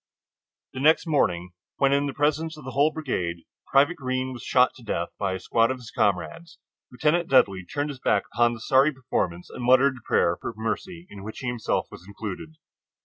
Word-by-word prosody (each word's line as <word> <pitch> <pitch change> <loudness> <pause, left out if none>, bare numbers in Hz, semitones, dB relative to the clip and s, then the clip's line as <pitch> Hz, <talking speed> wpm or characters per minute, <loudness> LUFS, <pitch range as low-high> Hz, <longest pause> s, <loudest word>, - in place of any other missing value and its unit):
The 130 - -6
next 155 +6 +4
morning, 90 - 0 0.3
when 140 0 +3
in 140 +1 +2
the 140 - -4
presence 155 +2 0
of 150 - -12
the 130 - -5
whole 145 +5 +3
brigade 90 - -3 0.2
Private 145 +6 +3
Greene 130 -1 -2
was 120 - -9
shot 125 +2 +3
to 125 - -15
death 85 -6 -2
by 100 -2 0
a 95 - -4
squad 115 +5 +2
of 130 - -2
his 120 -2 -12
comrades, 105 - -1 0.3
Lieutenant 155 +7 +1
Dudley 100 -8 +4
turned 145 +8 -3
his 135 - -10
back - - +2
upon 120 0 +3
the 110 - -11
sorry 135 +5 +4
performance 105 - -3
and 125 - -7
muttered 130 +2 +4
a - - -14
prayer 85 +1 +2
for 115 - -5
mercy, 170 +10 -4
in 100 - -9
which 110 +1 -8
himself 120 -3 -1
was - - -11
included. 105 - -7
130 Hz, 200 wpm, -25 LUFS, 110-145 Hz, 0.3 s, next